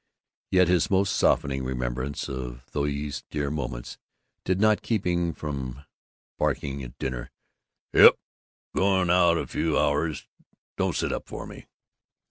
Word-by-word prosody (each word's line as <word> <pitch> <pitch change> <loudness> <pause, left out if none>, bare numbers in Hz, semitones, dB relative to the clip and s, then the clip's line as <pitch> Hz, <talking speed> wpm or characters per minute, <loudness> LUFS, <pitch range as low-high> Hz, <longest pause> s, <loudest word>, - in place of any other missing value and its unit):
Yet 90 -1 +4
his 90 +2 +2
most 95 -1 +2
softening 65 -1 +2
remembrance 65 +2 -3
of 60 -2 -6
these 70 0 -2
dear 70 -2 -2
moments 65 -5 -5 0.4
did 95 +1 0
not 110 0 +4
keep 110 -4 -1
him 85 -1 +1
from 70 -3 -6 0.5
barking 70 0 -1
at 65 0 -9
dinner, 60 -2 -4 0.6
"Yep, - - +9 0.6
going 95 -2 +3
out 85 -2 +5
f' - - -4
few 80 -2 0
hours. 75 +1 0 0.5
Don't - - 0
sit - - 0
up - - -5
for - - -7
me." - - -11
75 Hz, 135 wpm, -26 LUFS, 65-90 Hz, 0.6 s, Yep